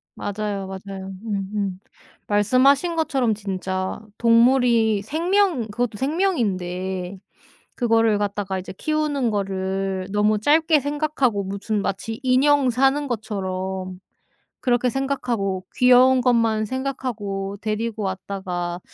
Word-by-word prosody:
맞아요, 205 -1 -3
맞아요. 190 0 -7
음음. 200 -2 -3 0.5
말씀하신 260 - +3
것처럼 275 -8 +1
진짜 190 -1 -3 0.2
동물이 230 -2 +4
생명 335 - +1
그것도 225 0 -2
생명인데 190 - -1 0.6
그거를 225 -3 +3
갖다가 200 -2 -2
이제 185 - -6
키우는 295 -2 -1
거를 190 -1 -2
너무 210 +1 +2
짧게 310 +5 +4
생각하고 285 -7 0
무슨 200 +2 -2
마치 220 +4 -3
인형 265 +1 +4
사는 270 +4 +2
것처럼 190 -5 -4 0.6
그렇게 245 0 +2
생각하고 240 -8 -2
귀여운 255 +1 +6
것만 230 -3 +2
생각하고 215 -6 -4
데리고 220 +1 -2
왔다가 185 -2 -4
215 Hz, 265 characters per minute, -22 LUFS, 195-260 Hz, 0.6 s, 귀여운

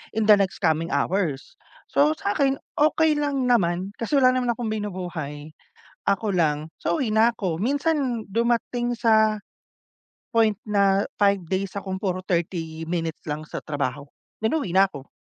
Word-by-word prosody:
in 220 -1 +1
the 210 - +10
next 195 -1 -1
coming 160 0 +1
hours, 150 -1 -1 0.3
so 145 +2 +4
sakin, 270 +6 +1 0.2
okey 310 0 +3
lang 285 -3 0
naman 185 -5 +2
kasi 230 +4 -4
wala 255 -1 +6
naman 250 -1 +1
akong 230 -1 -4
binubuhay, 175 -8 -5 0.6
ako 200 +2 +1
lang, 155 -2 +1
so - - 0
uwi 255 - 0
na 225 +2 +5
ako 185 -7 -2
minsan 275 -1 0
dumating 240 +2 0
sa, 220 -2 +3 0.9
point 220 -3 +3
na, 200 -1 +3
5 200 -1 +3
days 190 +2 -1
akong 190 -1 -4
puro 185 -2 -1
30 165 -2 -2
minutes 165 -2 -3
lang 150 +1 -3
sa - - -6
trabaho, 140 -2 -3 0.4
then 220 - +2
uwi 285 - -2
na 195 +1 +6
ako. 140 -6 -10
200 Hz, 155 wpm, -24 LUFS, 165-235 Hz, 0.9 s, the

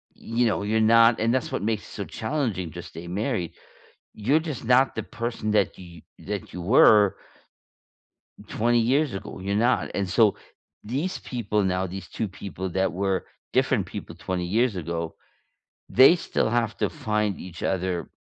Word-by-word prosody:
you 115 +2 -1
know, 105 -2 0
you're 110 +2 +1
not 115 +1 +6
and 115 +2 +2
that's 130 -2 -1
what - - -2
makes 105 0 -1
it - - -14
so - - -5
challenging 110 - -3
to 85 +3 -7
stay 85 +1 -10
married, 95 - -2 0.6
you're 130 +9 +2
just 155 -5 -5
not 125 +3 +3
the - - -3
person 115 -2 -4
that 105 - +1
you 85 -2 -12 0.2
that 100 -2 -6
you 90 - -5
were 105 0 +6 1.3
20 120 +2 +2
years 130 +2 +2
ago, 95 - -7
you're 100 +2 -2
not, 120 +4 +2
and 100 -1 -1
so 105 +3 +4 0.5
these 140 - -2
people 105 -4 -2
now, 95 0 0
these 95 0 -7
2 110 - -3
people 95 -1 -6
that 95 +1 0
were 95 0 -1 0.3
different - - +1
people - - -7
20 90 -1 -3
years 110 +5 +1
ago, 85 -1 -4 0.7
they 130 +7 +7
still 165 - -1
have 115 -1 0
to - - 0
find 105 -2 -1
each 90 -1 -9
other 90 -2 -1
105 Hz, 170 wpm, -25 LUFS, 95-120 Hz, 1.3 s, they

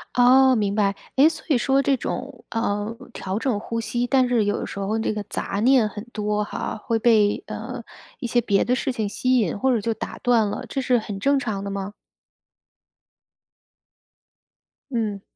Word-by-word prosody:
哦， 255 +1 +6
明 205 -2 0
白。 200 -2 +1 0.2
诶， 295 +4 +7
所 320 -1 -8
以 275 - +4
说 270 +2 +2
这 275 - +3
种， 255 +1 -5
呃， 215 -1 -2 0.2
调 190 +1 -4
整 230 -4 0
呼 230 +1 -4
吸， 240 +2 -1
但 260 -1 +3
是 235 -4 +2
有 205 - 0
的 - - -3
时 200 - -7
候 205 +3 -1
这 220 - -1
个 210 -1 -4
杂 200 - -3
念 250 -4 +5
很 210 +1 -7
多 210 0 -1
哈， - - -4
会 230 - 0
被， 220 +2 +3
呃， - - -6 0.4
一 250 - -5
些 240 +1 +2
别 200 -3 +2
的 245 - +1
事 265 - -1
情 220 -4 -2
吸 255 +5 +1
引 205 -4 0
或 265 +5 +2
者 235 - +2
就 225 +2 -1
打 - - -6
断 235 -4 +3
了， - - -5
这 270 - -2
是 250 -1 +2
很 205 -3 -5
正 280 +6 +3
常 215 -7 -3
的 200 - -4
吗？ 200 +1 -4 3.0
嗯。 215 -4 -2
225 Hz, 205 characters per minute, -23 LUFS, 205-250 Hz, 3.0 s, 诶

